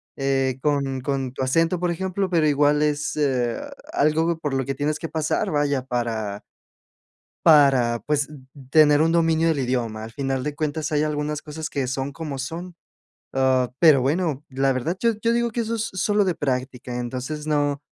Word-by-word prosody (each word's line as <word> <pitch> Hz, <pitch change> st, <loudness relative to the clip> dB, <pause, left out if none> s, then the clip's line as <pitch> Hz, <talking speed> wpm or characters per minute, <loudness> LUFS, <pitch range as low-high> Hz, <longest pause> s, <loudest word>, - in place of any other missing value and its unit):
eh, 135 Hz, -1 st, 0 dB
con 140 Hz, -3 st, 0 dB
con 135 Hz, -2 st, -2 dB
tu 130 Hz, -, -3 dB
acento, 165 Hz, +7 st, +2 dB
por 175 Hz, 0 st, -1 dB
ejemplo. 190 Hz, +2 st, -2 dB
Pero 165 Hz, -4 st, +2 dB
igual, 145 Hz, +1 st, +3 dB
es, 150 Hz, 0 st, 0 dB
eh, 125 Hz, -5 st, 0 dB, 0.3 s
algo 160 Hz, +3 st, +2 dB
por 145 Hz, -4 st, -3 dB
lo 135 Hz, 0 st, 0 dB
que 135 Hz, +2 st, -3 dB
tienes 150 Hz, +2 st, -1 dB
que 165 Hz, -, -6 dB
pasar, 155 Hz, -1 st, -1 dB
vaya, 145 Hz, -3 st, +1 dB
para 115 Hz, -5 st, -2 dB, 1.0 s
para, 135 Hz, -7 st, +5 dB
pues, 145 Hz, -1 st, +1 dB, 0.4 s
tener 150 Hz, -1 st, +6 dB
un 165 Hz, +1 st, +3 dB
dominio 165 Hz, -1 st, +3 dB
del 155 Hz, -4 st, +1 dB
idioma. 120 Hz, -4 st, -2 dB
Al 110 Hz, -, -8 dB
final 135 Hz, 0 st, -2 dB
de 150 Hz, -, -3 dB
cuentas, 155 Hz, 0 st, -2 dB
hay 150 Hz, 0 st, +2 dB
algunas 150 Hz, 0 st, -2 dB
cosas, 155 Hz, +1 st, -6 dB
que 135 Hz, -3 st, -2 dB
son 135 Hz, +2 st, -3 dB
como 150 Hz, -2 st, -6 dB
son. 170 Hz, +6 st, -6 dB, 0.6 s
Ah, 130 Hz, -2 st, +2 dB
pero, 155 Hz, -5 st, +7 dB
bueno, 150 Hz, 0 st, 0 dB
la 135 Hz, 0 st, +1 dB
verdad, 155 Hz, +8 st, -2 dB
yo 230 Hz, -1 st, +3 dB
yo 230 Hz, +1 st, +2 dB
digo 235 Hz, 0 st, +1 dB
que 235 Hz, +1 st, -2 dB
eso 230 Hz, 0 st, -2 dB
es 225 Hz, 0 st, -2 dB
sólo 205 Hz, +2 st, +1 dB
de 180 Hz, -3 st, 0 dB
práctica. 125 Hz, -2 st, -3 dB
Entonces, 130 Hz, +5 st, -5 dB
no 145 Hz, -1 st, 0 dB
145 Hz, 180 wpm, -23 LUFS, 130-160 Hz, 1.0 s, pero